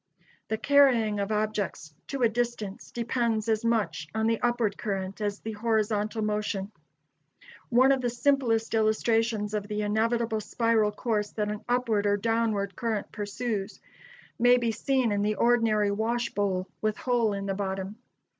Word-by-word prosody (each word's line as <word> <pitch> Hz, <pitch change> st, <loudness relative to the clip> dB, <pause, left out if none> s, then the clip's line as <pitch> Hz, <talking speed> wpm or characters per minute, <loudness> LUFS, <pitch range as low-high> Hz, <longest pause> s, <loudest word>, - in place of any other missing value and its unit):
The 220 Hz, -, -1 dB
carrying 245 Hz, -7 st, +4 dB
of 200 Hz, +1 st, -2 dB
objects 210 Hz, -7 st, -2 dB
to 275 Hz, -3 st, -2 dB
a -, -, +7 dB
distance 225 Hz, -3 st, -3 dB
depends 235 Hz, -2 st, -1 dB
as 220 Hz, -1 st, +1 dB
much 205 Hz, -10 st, 0 dB
on 220 Hz, 0 st, +1 dB
the 225 Hz, 0 st, +1 dB
upward 240 Hz, -4 st, +1 dB
current 195 Hz, -1 st, -4 dB
as 205 Hz, -1 st, -2 dB
the 220 Hz, -, -5 dB
horizontal 215 Hz, 0 st, 0 dB
motion. 210 Hz, -1 st, -2 dB, 1.0 s
One 255 Hz, +3 st, +5 dB
of 270 Hz, -1 st, +2 dB
the 245 Hz, -, 0 dB
simplest 240 Hz, -3 st, +1 dB
illustrations 220 Hz, -1 st, +1 dB
of 205 Hz, -1 st, -2 dB
the 210 Hz, 0 st, -2 dB
inevitable 220 Hz, +1 st, 0 dB
spiral 225 Hz, -1 st, +1 dB
course 210 Hz, -1 st, -1 dB
that 210 Hz, -1 st, -1 dB
an 210 Hz, -, -6 dB
upward 230 Hz, -4 st, +1 dB
or 205 Hz, 0 st, +3 dB
downward 220 Hz, -2 st, 0 dB
current 225 Hz, -4 st, -2 dB
pursues 205 Hz, 0 st, -4 dB, 0.6 s
may 245 Hz, +1 st, +6 dB
be 235 Hz, -2 st, 0 dB
seen 260 Hz, 0 st, 0 dB
in 205 Hz, 0 st, 0 dB
the 210 Hz, +1 st, +1 dB
ordinary 225 Hz, -4 st, +3 dB
wash 235 Hz, +3 st, -1 dB
bowl 190 Hz, -2 st, -1 dB
with 215 Hz, -1 st, 0 dB
hole 240 Hz, -4 st, +1 dB
in 200 Hz, 0 st, -4 dB
the 195 Hz, -, -1 dB
bottom. 195 Hz, +1 st, -4 dB
220 Hz, 155 wpm, -27 LUFS, 205-235 Hz, 1.0 s, a